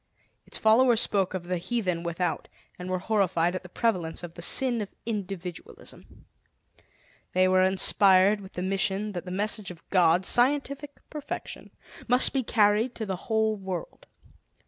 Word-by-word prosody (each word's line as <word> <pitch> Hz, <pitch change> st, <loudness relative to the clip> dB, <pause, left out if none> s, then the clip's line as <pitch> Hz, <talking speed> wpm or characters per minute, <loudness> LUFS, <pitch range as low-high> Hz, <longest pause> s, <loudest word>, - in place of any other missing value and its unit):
Its -, -, -5 dB
followers 230 Hz, +1 st, +4 dB
spoke 195 Hz, -4 st, 0 dB
of 185 Hz, -, -4 dB
the 180 Hz, 0 st, -3 dB
heathen 185 Hz, -4 st, -2 dB
without, 170 Hz, 0 st, -3 dB, 0.3 s
and 180 Hz, +1 st, -6 dB
were 185 Hz, -, 0 dB
horrified 180 Hz, -3 st, 0 dB
at 185 Hz, -, -4 dB
the 180 Hz, -, -13 dB
prevalence 180 Hz, -6 st, -1 dB
of 170 Hz, -1 st, -8 dB
the 170 Hz, -, -10 dB
sin 240 Hz, +5 st, +2 dB
of 200 Hz, -, -8 dB
individualism. 195 Hz, -5 st, -8 dB, 1.1 s
They 185 Hz, 0 st, +3 dB
were 185 Hz, 0 st, +3 dB
inspired 190 Hz, +1 st, +4 dB
with 190 Hz, -, -12 dB
the 180 Hz, -, -4 dB
mission 195 Hz, +2 st, -1 dB
that 175 Hz, -2 st, -6 dB
the -, -, -7 dB
message 205 Hz, +2 st, -1 dB
of 170 Hz, -2 st, -12 dB
God 180 Hz, -1 st, +3 dB
scientific 280 Hz, +4 st, 0 dB
perfection 300 Hz, -2 st, -7 dB, 0.4 s
must 250 Hz, +1 st, +3 dB
be 270 Hz, -, +1 dB
carried 220 Hz, +1 st, +2 dB
to 220 Hz, -, -4 dB
the 190 Hz, -2 st, -3 dB
whole 220 Hz, -1 st, +1 dB
world. 190 Hz, -4 st, -7 dB
195 Hz, 155 wpm, -27 LUFS, 180-220 Hz, 1.1 s, followers